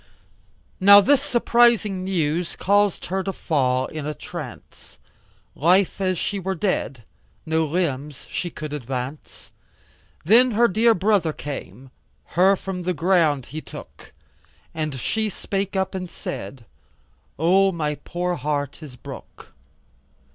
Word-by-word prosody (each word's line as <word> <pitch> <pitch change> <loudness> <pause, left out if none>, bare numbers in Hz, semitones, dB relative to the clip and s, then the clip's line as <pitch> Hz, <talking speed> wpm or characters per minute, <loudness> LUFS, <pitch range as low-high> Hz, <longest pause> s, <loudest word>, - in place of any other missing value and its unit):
Now 200 +1 +9
this 275 +6 +4
surprising 235 -6 +3
news 175 -2 -1
caus'd 205 0 +1
her 190 +1 -2
fall 130 -9 0
in 150 0 -6
'a 150 - -3
trance, - - -10 0.6
Life 185 +5 +2
as 185 -1 +1
she 200 +5 -2
were 190 +1 -2
dead, 165 - -2 0.4
no 160 0 +1
limbs 150 -4 -2
she 175 - -3
could 155 -2 -7
advance, 130 +1 -6 0.7
Then 235 +6 +5
her 235 0 +6
dear 225 +3 +3
brother 190 -4 +2
came, 135 -4 -8 0.4
her 190 +3 +5
from 190 -1 -5
the 180 0 -2
ground 165 -6 +2
he 155 - -4
took - - -12 0.6
And 155 -3 -3
she 220 - -1
spake 195 0 -3
up 190 0 0
and 185 -2 -5
said, 130 -6 -7 0.7
O 190 +5 +4
my 155 -4 -2
poor 180 +1 -2
heart 145 +1 -3
is 145 -5 -10
broke. 120 - -12
175 Hz, 125 wpm, -23 LUFS, 150-195 Hz, 0.7 s, Now